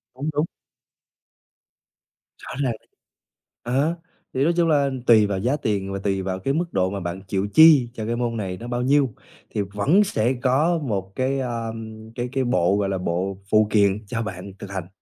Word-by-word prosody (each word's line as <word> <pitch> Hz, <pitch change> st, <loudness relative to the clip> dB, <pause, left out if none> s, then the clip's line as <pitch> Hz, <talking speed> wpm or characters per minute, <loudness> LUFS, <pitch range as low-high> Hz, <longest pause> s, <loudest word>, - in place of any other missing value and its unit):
Đúng, 140 Hz, +4 st, -3 dB
đúng. 150 Hz, +3 st, +1 dB, 1.9 s
Rõ -, -, -10 dB
ràng. 125 Hz, -4 st, 0 dB, 0.9 s
Ờ, 140 Hz, +8 st, +1 dB, 0.4 s
thì 130 Hz, -, +1 dB
nói 170 Hz, -, +3 dB
chung 170 Hz, -1 st, +3 dB
là 145 Hz, -3 st, +3 dB, 0.2 s
tùy 110 Hz, -3 st, +7 dB
vào 100 Hz, -1 st, -2 dB
giá 125 Hz, +8 st, +1 dB
tiền 100 Hz, -6 st, -2 dB
và 100 Hz, -, -3 dB
tùy 95 Hz, -1 st, -1 dB
vào 95 Hz, 0 st, -3 dB
cái 135 Hz, +8 st, -1 dB
mức 170 Hz, +3 st, -2 dB
độ 95 Hz, 0 st, +2 dB
mà 100 Hz, 0 st, -4 dB
bạn 90 Hz, +1 st, -5 dB
chịu 95 Hz, +1 st, -1 dB
chi 155 Hz, -6 st, +7 dB
cho 110 Hz, -3 st, -5 dB
cái 115 Hz, -, -1 dB
môn 120 Hz, -1 st, -2 dB
này 95 Hz, -3 st, -3 dB
nó 120 Hz, -, -8 dB
bao 120 Hz, 0 st, -2 dB
nhiêu 135 Hz, -2 st, +2 dB, 0.4 s
thì 105 Hz, -, -2 dB
vẫn 105 Hz, -, +2 dB
sẽ 125 Hz, -, 0 dB
có 145 Hz, +7 st, +2 dB
một 100 Hz, -6 st, -3 dB
cái, 135 Hz, +1 st, 0 dB
à, 120 Hz, -3 st, -3 dB, 0.5 s
cái 120 Hz, 0 st, -3 dB
cái 135 Hz, -1 st, 0 dB
bộ, 100 Hz, -7 st, +2 dB
gọi 100 Hz, -1 st, 0 dB
là, 95 Hz, -, -1 dB
bộ 90 Hz, +2 st, -2 dB
phụ 110 Hz, 0 st, +5 dB
kiện 100 Hz, 0 st, +2 dB
cho 115 Hz, +2 st, -2 dB
bạn 95 Hz, -1 st, -6 dB
thực 100 Hz, -1 st, -8 dB
hành. 95 Hz, -3 st, -4 dB
115 Hz, 195 wpm, -23 LUFS, 95-135 Hz, 1.9 s, tùy